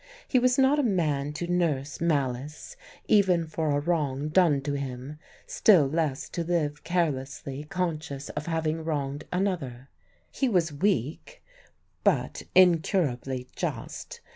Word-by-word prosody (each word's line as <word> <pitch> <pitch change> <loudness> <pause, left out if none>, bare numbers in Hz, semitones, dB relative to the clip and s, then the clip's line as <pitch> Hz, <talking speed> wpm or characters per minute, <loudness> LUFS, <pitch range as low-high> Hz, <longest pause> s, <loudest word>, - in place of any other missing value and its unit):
He 255 - +3
was 250 0 +3
not 270 +2 +4
a - - +2
man 155 - 0
to 170 +3 -4
nurse 160 -6 -1
malice 145 -3 -2 0.3
even 185 -5 +4
for 160 0 -2
a 145 0 +2
wrong 150 -3 -1
done 160 -4 +4
to 145 +1 -3
him, 140 +1 -5 0.3
still 185 -9 +5
less 150 -1 -1
to 170 - -3
live 155 -4 -1
carelessly 145 -4 -2
conscious 155 -5 -3
of 150 - -5
having 160 -1 -1
wronged 145 -2 -3
another. 165 -10 -2 0.4
He 265 - 0
was 170 -7 +1
weak, 165 - -1 0.6
but - - +1
incurably 155 -8 +3
just. - - -5
155 Hz, 130 wpm, -27 LUFS, 140-175 Hz, 0.6 s, still